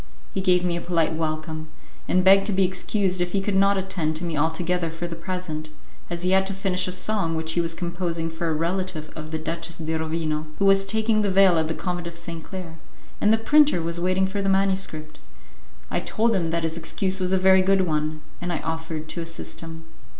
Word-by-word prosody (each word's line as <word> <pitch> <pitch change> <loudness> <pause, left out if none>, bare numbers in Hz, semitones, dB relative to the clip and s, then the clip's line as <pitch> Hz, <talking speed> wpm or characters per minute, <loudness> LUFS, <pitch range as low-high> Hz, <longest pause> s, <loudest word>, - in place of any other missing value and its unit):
He 190 - -1
gave 180 -1 +3
me 175 -1 0
a 170 - -3
polite 165 -2 +1
welcome, 155 0 -3 0.4
and 185 - +2
begged 195 +1 +6
to - - 0
be 190 0 +3
excused 185 0 +1
if 175 0 -1
he 200 - +2
could 195 +1 -1
not 195 +1 +4
attend 185 -5 -1
to 160 - -3
me 170 -2 -2
altogether 165 +3 0
for 165 +2 -6
the 170 -1 -5
present, 165 -3 -5 0.4
as 170 0 -4
he 180 - +1
had 190 0 +4
to 195 - -4
finish 185 -1 0
a - - -2
song 185 -2 0
which 160 0 -1
he 170 - +1
was 165 -1 -2
composing 170 -1 -3
for 165 +1 -3
a - - +1
relative 170 -1 -2
of 155 -1 -7
the 160 - -2
Duchess 165 +1 -3
de 160 0 -3
Rovino, 160 -1 -2
who 200 - +1
was 195 0 +5
taking 220 +1 +2
the 205 - +1
veil 190 -3 +5
at 160 - 0
the 160 - -2
Convent 175 -2 -3
of 170 - -7
St. 165 -1 -7
Claire, 175 -4 -8 0.4
and 210 - +4
the 220 - +5
printer 295 -1 +4
was 170 +1 -2
waiting 185 +1 +2
for 195 +1 -2
the 195 - 0
manuscript. 190 -5 0 0.7
I - - +1
told 230 +1 +1
him 175 -5 0
that 170 0 -1
his 160 +1 -2
excuse 190 +3 +1
was 185 0 0
a 190 - +4
very 190 0 +5
good 195 +1 +3
one, 155 -2 -1 0.2
and 175 0 -2
I 165 - 0
offered 160 -1 -4
to 170 - -2
assist 165 0 -6
him. 165 0 -8
175 Hz, 230 wpm, -24 LUFS, 160-190 Hz, 0.7 s, begged